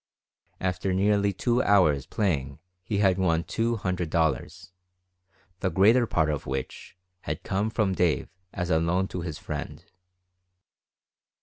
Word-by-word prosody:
After 95 Hz, +1 st, -1 dB
nearly 100 Hz, +1 st, +2 dB
two 120 Hz, +6 st, +1 dB
hours 90 Hz, -, +3 dB
playing 70 Hz, -10 st, -1 dB, 0.3 s
he 100 Hz, +2 st, -2 dB
had 95 Hz, -2 st, +3 dB
won 85 Hz, -3 st, +2 dB
two 115 Hz, +4 st, -1 dB
hundred 90 Hz, -5 st, -2 dB
dollars, 80 Hz, +1 st, -1 dB, 0.9 s
the 95 Hz, -, 0 dB
greater 110 Hz, +8 st, +4 dB
part 80 Hz, -5 st, +1 dB
of 75 Hz, -, -4 dB
which 65 Hz, +6 st, -5 dB, 0.3 s
had -, -, -3 dB
come 100 Hz, +3 st, -1 dB
from 110 Hz, -4 st, 0 dB
Dave 90 Hz, -4 st, +1 dB, 0.2 s
as 90 Hz, -2 st, -3 dB
a 80 Hz, -, +4 dB
loan 90 Hz, +3 st, +1 dB
to 90 Hz, -, -4 dB
his 80 Hz, -4 st, -5 dB
friend. -, -, -6 dB
95 Hz, 135 wpm, -26 LUFS, 80-100 Hz, 0.9 s, greater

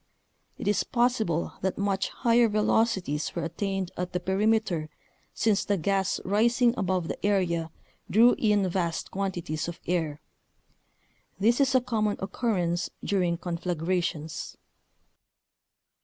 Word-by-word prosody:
It -, -, -5 dB
is 205 Hz, -, +2 dB
possible 235 Hz, -9 st, 0 dB
that 190 Hz, 0 st, -1 dB
much 195 Hz, -1 st, 0 dB
higher 235 Hz, -1 st, +3 dB
velocities 210 Hz, -7 st, +1 dB
were 170 Hz, -, -2 dB
attained 190 Hz, +2 st, -2 dB
at 180 Hz, 0 st, -4 dB
the 180 Hz, -, 0 dB
perimeter 190 Hz, -4 st, +1 dB, 0.5 s
since 215 Hz, -3 st, +2 dB
the 205 Hz, -, 0 dB
gas 195 Hz, +2 st, 0 dB
rising 235 Hz, +4 st, +3 dB
above 185 Hz, -4 st, -1 dB
the -, -, -6 dB
area 175 Hz, -5 st, +1 dB, 0.4 s
drew 235 Hz, +4 st, +6 dB
in 210 Hz, -3 st, +3 dB
vast 175 Hz, -2 st, -2 dB
quantities 175 Hz, -6 st, -3 dB
of 170 Hz, -, -6 dB
air. 160 Hz, -4 st, -1 dB, 1.2 s
This 235 Hz, +6 st, +3 dB
is 265 Hz, -1 st, +3 dB
a 255 Hz, -, +5 dB
common 215 Hz, -4 st, 0 dB
occurrence 185 Hz, -4 st, -1 dB
during 180 Hz, -4 st, +1 dB
conflagrations. 170 Hz, -2 st, -3 dB
190 Hz, 120 wpm, -27 LUFS, 170-215 Hz, 1.2 s, drew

